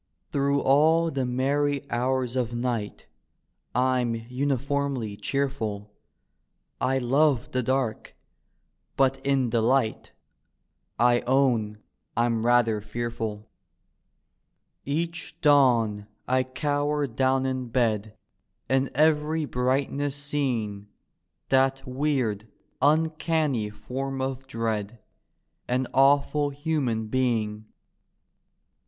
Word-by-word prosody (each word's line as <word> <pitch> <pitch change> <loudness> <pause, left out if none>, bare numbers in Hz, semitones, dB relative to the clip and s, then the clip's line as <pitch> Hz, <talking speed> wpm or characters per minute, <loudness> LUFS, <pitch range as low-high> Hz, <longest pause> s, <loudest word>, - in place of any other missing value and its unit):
Through 140 0 +1
all 160 +4 +4
the 135 -3 -1
meriy 140 +3 0
hours 125 +1 0
of 125 -3 0
ni^t 120 -3 -3 0.7
I'm 125 -2 +1
unifoimly 130 -1 -2
cheerful; 110 -7 -2 0.9
I 130 +1 +2
love 130 0 +2
the 130 - 0
dark; 130 -2 -2 0.8
but 135 0 +2
in 135 -4 +1
the 115 - +2
light, 120 -1 +1 0.9
I 120 0 +4
own 120 -6 +1 0.3
I'm 115 -1 +1
rather 115 -3 +3
fcarfuL 110 -1 -4 1.4
Each 165 +4 -3
dawn 120 -8 +3 0.2
I 130 0 +2
cower 145 +2 -1
down 130 +1 +1
in 130 -1 -2
bed, 110 -3 0 0.5
In 135 0 +1
every 155 +1 +2
brightness 135 +2 -1
seeing 125 -9 -2 0.6
That 135 0 +2
weird 125 -6 -1 0.3
uncanny 155 -5 +1
form 130 +6 -5
of 135 0 -3
dread 115 -3 -3 0.4
— - - -50 0.3
An 130 +1 0
awful 140 +2 +3
Human 140 -6 -1
Being! 110 -3 -1
130 Hz, 95 wpm, -26 LUFS, 115-140 Hz, 1.4 s, all